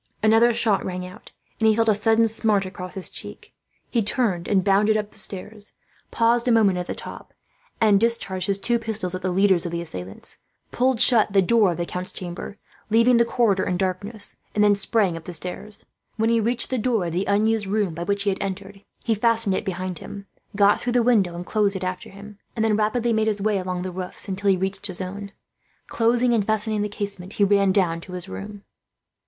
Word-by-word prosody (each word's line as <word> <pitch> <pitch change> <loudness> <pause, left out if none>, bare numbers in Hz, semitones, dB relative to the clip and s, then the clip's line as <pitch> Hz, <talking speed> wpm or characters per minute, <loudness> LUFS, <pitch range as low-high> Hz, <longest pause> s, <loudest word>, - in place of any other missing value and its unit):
Another 225 +2 +5
shot 225 -3 0
rang 180 0 -5
out, 185 0 -12 0.3
and 220 - +3
he 220 - +4
felt 225 0 +1
a 215 - +5
sudden 225 +2 +3
smart 215 -3 +1
across 185 0 -8
his 190 - -2
cheek. - - -9 0.4
He 235 - +1
turned 200 -5 0
and 195 -2 +2
bounded 205 +2 +3
up 210 0 -4
the - - -12
stairs, 205 +2 -2 0.4
paused 235 +1 +1
a - - +4
moment 205 -5 +3
at 180 - -5
the - - -4
top, - - -10 0.4
and 210 -3 +4
discharged 195 -5 0
his 200 -1 +1
two 235 +4 0
pistols 220 -5 -2
at 185 - -4
the 185 - -1
leaders 185 -1 +2
of - - -6
the 170 - -3
assailants; 95 - -6 0.3
pulled 255 0 +1
to 225 -2 +6
the 195 -1 +3
door 220 0 +3
of - - -9
the 175 - -2
count's 180 +1 -2
chamber, 180 +3 -7 0.3
leaving 230 +3 +4
the 235 - +4
corridor 225 -5 +1
in 180 - -1
darkness, 200 +3 -2 0.2
and 210 - +3
then 205 -1 +5
sprang 200 -2 +1
up 165 -1 -9
the 180 - -6
stairs. 185 +5 -6 0.3
When 225 +1 +1
he 230 - +3
reached 235 +3 +1
the 255 - 0
door 225 -5 0
of 170 - -3
the 185 +3 -1
unused 210 +1 +1
room 200 -3 -1
by 170 - -7
which 200 +3 -1
they 200 - +1
had 190 - -5
entered, 195 +1 -6 0.2
he 230 - +1
fastened 225 -1 +2
it - - -2
behind 185 -1 -4
him, 200 -1 -9 0.3
got 200 0 +4
through 245 - -3
the 245 -1 +3
window 205 -8 +2
and 175 +1 -6
closed 205 -1 0
it 190 - -4
after 185 0 -4
him, 205 +1 -13 0.2
and 220 -1 0
then 215 -1 +2
rapidly 225 +2 0
made 220 0 +1
his 210 -2 0
way 205 0 0
along 180 -1 -4
the 185 - -4
roofs, 180 +2 -6
until 200 +1 -1
he 190 - +3
reached 190 +2 -2
his 185 -3 -1
own. 200 +2 -6 0.6
Closing 240 +1 +2
and 220 -3 +2
fastening 215 0 -1
the 210 - -2
casement, 200 -2 -5
he 205 - +1
ran 200 -1 +3
down 175 -4 +1
to 180 - -10
his 180 0 -7
room. 205 +1 -8
205 Hz, 225 wpm, -23 LUFS, 185-220 Hz, 0.6 s, to